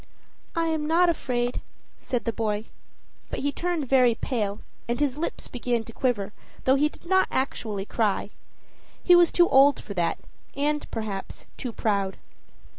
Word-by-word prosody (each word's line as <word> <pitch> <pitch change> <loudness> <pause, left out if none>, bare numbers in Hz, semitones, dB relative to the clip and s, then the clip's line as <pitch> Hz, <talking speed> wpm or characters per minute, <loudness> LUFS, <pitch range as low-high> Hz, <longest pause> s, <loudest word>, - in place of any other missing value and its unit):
"I 330 0 +1
am 310 -2 -1
not 345 +2 +4
afraid," 245 -6 -1 0.4
said 245 -2 -3
the 230 - 0
boy; 215 -1 -1 0.6
but - - -4
he 285 - 0
turned 340 -3 -2
very 250 -3 +5
pale, 215 -5 -2 0.3
and 240 - 0
his 285 -3 +1
lips 315 +3 -4
began 240 -2 -1
to 230 - -11
quiver, 220 -7 -1 0.3
though 260 - +5
he 290 +2 +3
did - - -17
not 375 +2 +3
actually 220 -6 -2
cry 210 -2 0 0.7
he 355 - +7
was 350 -1 +6
too 345 -1 +5
old 275 +1 +6
for 205 - -7
that, 175 -3 0 0.4
and, 295 +1 0
perhaps, 210 -4 -5
too 250 - -5
proud. 200 -4 -1
250 Hz, 160 wpm, -26 LUFS, 220-300 Hz, 0.7 s, he